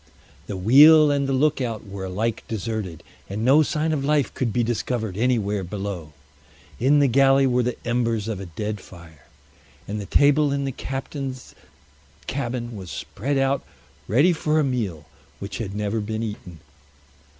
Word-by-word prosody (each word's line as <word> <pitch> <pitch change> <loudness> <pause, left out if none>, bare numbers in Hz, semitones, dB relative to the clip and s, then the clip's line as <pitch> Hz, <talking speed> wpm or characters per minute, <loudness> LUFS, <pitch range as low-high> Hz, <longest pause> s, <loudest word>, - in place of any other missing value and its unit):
The 100 - -4
wheel 145 +9 +7
and 140 -1 0
the - - +1
lookout 130 -5 0
were 100 -1 -6
alike 105 +4 -2
deserted, 110 -6 -4 0.3
and 105 +3 -3
no 140 +5 +6
sign 155 +1 0
of 140 -3 -1
life 145 -1 +1
could 120 -4 -1
be 120 +3 +1
discovered 110 -3 -2
anywhere 105 -4 0
below. 95 -4 -5 0.7
In 135 +5 +4
the 145 -1 +4
galley 135 +2 +4
were 125 -1 +2
the 125 0 -2
embers 115 -3 0
of 110 -4 -3
a 95 - -7
dead 105 +6 -4
fire, 80 -6 -15 0.6
and 105 +1 -4
the 100 - -8
table 145 0 +4
in 140 0 -1
the 135 - -2
captain's 135 0 -6 0.7
cabin 120 - -3
was 95 -3 -8
spread 140 +7 -3
out 135 0 +1 0.4
ready 145 - +4
for 155 -1 +1
a - - +3
meal 105 - -2 0.3
which 100 0 -6
had 100 -4 -4
never 105 +1 -1
been 110 +1 -3
eaten. 90 -7 -7
120 Hz, 160 wpm, -23 LUFS, 100-135 Hz, 0.7 s, wheel